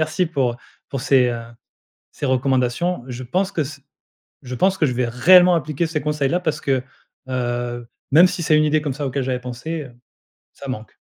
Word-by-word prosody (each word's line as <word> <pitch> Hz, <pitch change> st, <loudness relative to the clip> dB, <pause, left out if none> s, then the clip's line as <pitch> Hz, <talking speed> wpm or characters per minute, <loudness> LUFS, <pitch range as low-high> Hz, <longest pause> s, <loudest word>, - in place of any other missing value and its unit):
merci 155 Hz, +4 st, 0 dB
pour 135 Hz, -7 st, -1 dB, 0.3 s
pour 135 Hz, -, -4 dB
ces, 125 Hz, 0 st, +4 dB
heu, 120 Hz, -1 st, -3 dB, 0.7 s
ces -, -, -5 dB
recommandations. 130 Hz, +4 st, 0 dB
Je 125 Hz, 0 st, -6 dB
pense 185 Hz, +10 st, -1 dB
que 160 Hz, -, 0 dB
ce 140 Hz, +1 st, -8 dB, 0.6 s
je 130 Hz, 0 st, -6 dB
pense 190 Hz, +8 st, +2 dB
que 155 Hz, -, +3 dB
je 130 Hz, -, -1 dB
vais 125 Hz, 0 st, -1 dB
réellement 175 Hz, +9 st, +6 dB
appliquer 155 Hz, +1 st, -1 dB
ces 155 Hz, -1 st, -2 dB
conseils-là 150 Hz, +1 st, 0 dB
parce 160 Hz, -4 st, -2 dB
que, 135 Hz, -2 st, +1 dB, 0.5 s
heu, 120 Hz, -1 st, -3 dB, 0.2 s
même 165 Hz, +5 st, +8 dB
si 180 Hz, 0 st, -4 dB
c'est 155 Hz, -, +4 dB
une 155 Hz, -, +4 dB
idée 155 Hz, 0 st, +2 dB
comme 145 Hz, -2 st, -2 dB
ça 145 Hz, +1 st, -4 dB
auquel 135 Hz, +1 st, -2 dB
j'avais 125 Hz, -1 st, -2 dB
pensée, 130 Hz, +5 st, -5 dB, 0.7 s
ça 140 Hz, -, -10 dB
manque. 110 Hz, -5 st, -6 dB
140 Hz, 190 wpm, -21 LUFS, 125-160 Hz, 0.7 s, même